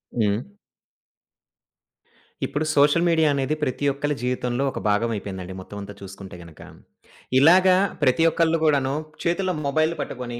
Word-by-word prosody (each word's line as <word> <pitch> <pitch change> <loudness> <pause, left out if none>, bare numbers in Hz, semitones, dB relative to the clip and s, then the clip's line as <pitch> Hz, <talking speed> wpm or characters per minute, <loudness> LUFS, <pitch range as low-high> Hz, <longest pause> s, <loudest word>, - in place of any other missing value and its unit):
హ్మ్. 105 -3 +1 2.1
ఇప్పుడు 150 +2 -2
social 150 +4 +4
media 160 -2 +3
అనేది 140 +2 -1
ప్రతి 145 0 -2
ఒక్కలి 145 +2 -2
జీవితంలో 125 +1 -1
ఒక - - -6
భాగం 105 +3 +1
అయిపోయిందండి 95 -2 -6
మొత్తం 100 +2 -10
అంతా 100 +1 -9
చూసుకుంటే 95 -1 -10
గనక. 85 -3 -15 0.8
ఇలాగ 180 +6 +6 0.3
ప్రతి 130 +6 +3
ఒక్కళ్ళు 165 0 +2
కూడాను 140 -3 +2 0.3
చేతిలో 185 +2 0
మొబైల్ 155 +3 +1
పట్టుకొని 120 -2 -6
135 Hz, 125 wpm, -23 LUFS, 105-155 Hz, 2.1 s, ఇలాగ